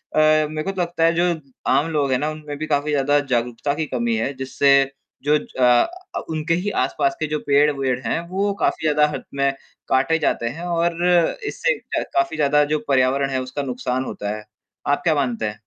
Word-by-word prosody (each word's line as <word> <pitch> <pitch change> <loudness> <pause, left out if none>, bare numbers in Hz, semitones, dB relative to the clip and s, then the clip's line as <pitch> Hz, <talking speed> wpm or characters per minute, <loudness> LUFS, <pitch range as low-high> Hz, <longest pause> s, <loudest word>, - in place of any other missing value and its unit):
अ, - - +4
मेरे 155 0 +3
को 195 - -2
तो 190 -2 -3
लगता 170 -1 -1
है 165 0 +4
जो 170 - +2 0.5
आम 150 - +3
लोग 145 -3 +1
हैं 130 - +3
ना 150 - -1
उनमें 150 -2 -7
भी 155 +1 -4
काफ़ी 145 0 0
ज़्यादा 145 0 +3
जागरूकता 125 0 -1
की 160 0 -2
कमी 120 -2 0
है 135 +5 -1
जिससे 135 +1 +2 0.5
जो 150 +1 +4
ज - - -8
अ, 335 - +2
उनके 160 +1 -1
ही 205 - -1
आसपास 345 -1 0
के - - -1
जो 150 0 -2
पेड़-वेड़ 140 -3 +2
हैं, - - 0
वो 200 +2 0
काफ़ी - - 0
ज़्यादा 150 0 +4
हद - - -5
में 140 0 +1 0.4
काटे 135 +5 +3
जाते 120 - 0
हैं 170 - -7
और 170 0 0 0.4
इससे - - 0 0.2
क - - 0
काफ़ी 345 0 +1
ज़्यादा 150 0 +3
जो 155 - +1
पर्यावरण 135 +1 +2
है 130 -1 -1
उसका 130 +3 -4
नुकसान 125 0 -2
होता 105 +1 -4
है। 105 - -11 0.4
आप 145 - +2
क्या 160 -3 +3
मानते 125 -6 -1
हैं? 105 0 -6
145 Hz, 205 wpm, -21 LUFS, 130-160 Hz, 0.5 s, अ